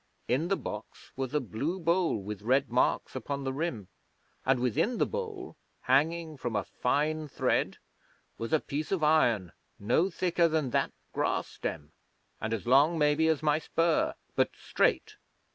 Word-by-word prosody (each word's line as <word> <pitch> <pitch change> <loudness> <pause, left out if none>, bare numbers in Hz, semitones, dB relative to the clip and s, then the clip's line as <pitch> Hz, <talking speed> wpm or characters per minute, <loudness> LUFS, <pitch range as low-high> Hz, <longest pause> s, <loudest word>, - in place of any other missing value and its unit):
In 135 +8 +1
the 195 +1 +1
box 105 +1 -8
was 130 -1 -3
a - - +4
blue 145 +8 -3
bowl 170 -3 +2
with 105 0 -6
red 130 +4 +2
marks 125 +2 +1
upon 140 +2 -3
the 135 0 -2
rim, 135 - -3 0.6
and 130 -1 +4
within 125 - +1
the - - +3
bowl, 435 -5 -5 0.3
hanging 155 +4 +1
from 120 -4 -3
a 105 - +1
fine 155 +4 -1
thread, - - 0 0.6
was 115 - -4
a 155 - +4
piece 150 +2 -4
of 185 -5 0
iron 120 - +3 0.3
no 125 - +2
thicker 175 -1 +2
than 155 -5 0
that - - +1 0.2
grass - - 0
stem, 75 0 -5 0.5
and 110 - -2
as 115 -1 -2
long, 140 +7 +5
maybe, 150 +1 +3
as 155 -2 +1
my 150 0 +3
spur, 165 +1 +1 0.2
but - - +3
straight. - - 0
150 Hz, 160 wpm, -30 LUFS, 125-165 Hz, 0.6 s, long